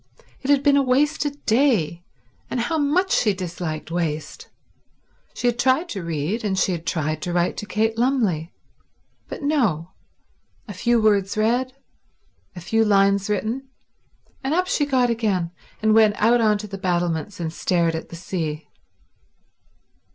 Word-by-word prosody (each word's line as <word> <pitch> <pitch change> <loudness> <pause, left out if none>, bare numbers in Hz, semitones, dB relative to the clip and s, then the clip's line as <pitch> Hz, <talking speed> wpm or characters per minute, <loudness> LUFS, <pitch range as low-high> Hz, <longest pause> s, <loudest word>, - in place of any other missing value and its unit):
It 270 - -5
had 285 -1 +4
been 285 -1 +5
a - - +5
wasted 285 +2 0
day, 220 - +2 0.5
and 250 - -2
how 315 +7 0
much 350 +7 +1
she 210 -4 +2
disliked 170 -4 -5
waste. 160 -3 -3 0.9
She - - -5
had 240 0 +1
tried 265 +8 +2
to 195 - -4
read, 170 +7 -2
and 195 -3 -1
she 185 - +2
had 170 -2 -5
tried 155 -1 -1
to 175 - -3
write 175 0 +1
to 210 - -5
Kate 220 +3 0
Lumley; 220 - +1 0.8
but - - -7
no—a 205 - -4
few 235 +5 +2
words 205 -2 +2
read, 245 +4 +1 0.8
a 175 - -8
few 225 +6 +1
lines 200 -1 +3
written, 235 +6 -2 0.7
and 275 +4 0
up 365 +1 +2
she 300 -6 0
got 255 -3 +2
again 200 -7 -1 0.3
and 220 0 +4
went 215 -1 +5
out 235 +2 +4
on 215 -2 +3
to 210 +1 -7
the 195 -1 -7
battlements 175 0 -1
and 160 -2 -3
stared 170 -1 +1
at 160 - -5
the - - -9
sea. 160 -3 -4
210 Hz, 155 wpm, -22 LUFS, 175-250 Hz, 0.9 s, been